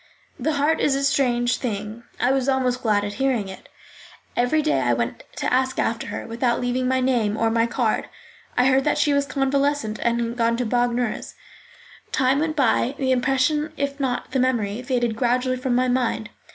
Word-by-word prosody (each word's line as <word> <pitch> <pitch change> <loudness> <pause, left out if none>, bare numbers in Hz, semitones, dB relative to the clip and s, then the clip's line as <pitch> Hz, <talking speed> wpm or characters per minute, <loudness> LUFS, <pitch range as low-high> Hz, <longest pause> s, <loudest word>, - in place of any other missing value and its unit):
The 315 - 0
heart 295 +3 +1
is 275 - +2
a 275 - -1
strange 250 -3 +2
thing; 215 -2 -4 0.2
I 250 - +2
was 270 0 +1
almost 255 -2 +1
glad 210 -3 +2
at 205 - -4
hearing 250 -7 +1
it. 190 -1 -11 0.7
Every 245 +6 +2
day 305 - +1
I 120 -1 +2
went 115 0 -3
to - - -1
ask 260 +1 +1
after 225 0 -1
her, - - -5
without 235 +1 0
leaving 250 +1 -1
my 260 0 +1
name 235 -5 +1
or 225 0 +1
my 230 0 +2
card. 235 -2 -1 0.5
I 250 - +4
heard 270 +2 +3
she 290 - +2
was 280 0 +1
convalescent 275 -5 0
and 235 0 +1
had 235 0 -3
gone 230 0 +2
to 250 - -1
Bagnères. 245 0 -1 0.8
Time 265 +1 +2
went 310 0 -1
by, 265 -1 +2
the 260 -1 0
impression, 270 +4 +1
if 280 0 -2
not 255 -3 -2
the 265 - 0
memory, 235 -4 0
faded 245 -3 -1
gradually 250 +2 +1
from 255 -1 -1
my 255 +1 +2
mind. 245 -3 -1
250 Hz, 190 wpm, -23 LUFS, 235-270 Hz, 0.8 s, I